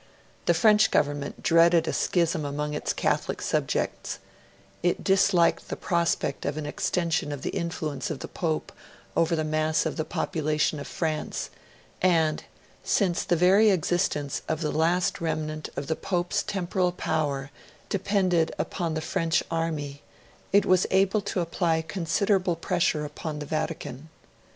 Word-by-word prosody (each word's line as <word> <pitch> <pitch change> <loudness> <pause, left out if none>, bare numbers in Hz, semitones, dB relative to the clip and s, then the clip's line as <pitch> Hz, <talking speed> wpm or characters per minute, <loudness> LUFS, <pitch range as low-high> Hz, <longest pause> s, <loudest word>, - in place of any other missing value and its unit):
The - - +4
French 215 -2 +5
Government 145 -1 -1
dreaded 165 0 +5
a - - 0
schism 165 -3 +1
among 150 +1 -3
its 150 - -1
Catholic - - -1
subjects; - - -1 0.6
it 175 0 0
disliked 190 -3 +3
the - - -2
prospect 170 -5 0
of 145 +1 -2
an 155 - -3
extension 165 0 -1
of 145 -2 -6
the - - -2
influence 155 -5 -3
of 155 - -3
the - - -7
Pope 160 -3 -2 0.4
over 165 0 +2
the 155 - 0
mass 155 +1 +1
of 160 - -2
the 155 - 0
population 155 -1 -1
of 140 - -6
France; 155 -2 -3 0.5
and, 165 -4 +2 0.4
since 185 -5 +1
the 175 - +1
very 190 +6 +5
existence 175 -5 0
of 160 0 -1
the 150 - 0
last 175 +5 +1
remnant 155 -1 -3
of 140 - -3
the 160 +2 -1
Pope's 180 +3 -1
Temporal 185 -2 -1
Power 145 -5 -2 0.4
depended 185 -4 +1
upon 170 -4 -2
the 160 - -1
French 165 +1 0
army, 155 -4 -2 0.5
it 200 +1 +5
was 185 -1 +3
able 195 +2 +3
to 200 -2 -2
apply 165 -1 0
considerable 185 +2 +1
pressure 170 -3 0
upon 150 +1 -5
the 150 - -5
Vatican. 155 -1 -4
165 Hz, 145 wpm, -26 LUFS, 155-180 Hz, 0.6 s, French